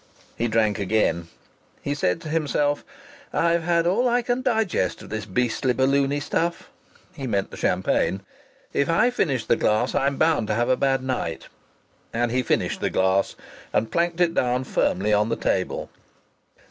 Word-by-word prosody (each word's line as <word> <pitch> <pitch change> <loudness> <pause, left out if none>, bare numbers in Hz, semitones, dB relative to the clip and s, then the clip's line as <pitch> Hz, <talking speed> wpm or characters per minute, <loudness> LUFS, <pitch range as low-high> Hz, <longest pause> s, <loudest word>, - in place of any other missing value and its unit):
He 120 - 0
drank 110 -2 +1
again. 100 -4 +1 0.6
He 145 - -1
said 90 -11 0
to 155 - -7
himself: 150 -2 0 0.5
"I've 170 0 +2
had 170 0 +1
all 230 +8 +2
I 240 0 +2
can 245 +1 0
digest 220 - 0
of - - -12
this 110 -2 -4
beastly 125 +4 0
balloony 140 +2 +2
stuff." 170 +3 -2 0.4
(He 140 -6 -5
meant 100 -4 -1
the - - -9
champagne.) 95 - +1 0.5
"If 140 - +1
I 235 +9 +3
finish 135 - 0
the - - +3
glass 110 +4 +1
I'm 140 0 +1
bound 155 -9 +2
to 110 - 0
have 120 +2 +1
a 130 - +4
bad 135 -1 +1
night." 125 -11 -3 0.6
And 120 0 0
he 130 +1 +2
finished - - -1
the - - +1
glass, 95 +1 +1 0.4
and 110 - 0
planked 170 0 0
it 175 -2 +3
down 125 -2 +1
firmly 105 -4 0
on 105 +2 +2
the 115 - 0
table. 95 -1 -2
130 Hz, 170 wpm, -24 LUFS, 110-165 Hz, 0.6 s, a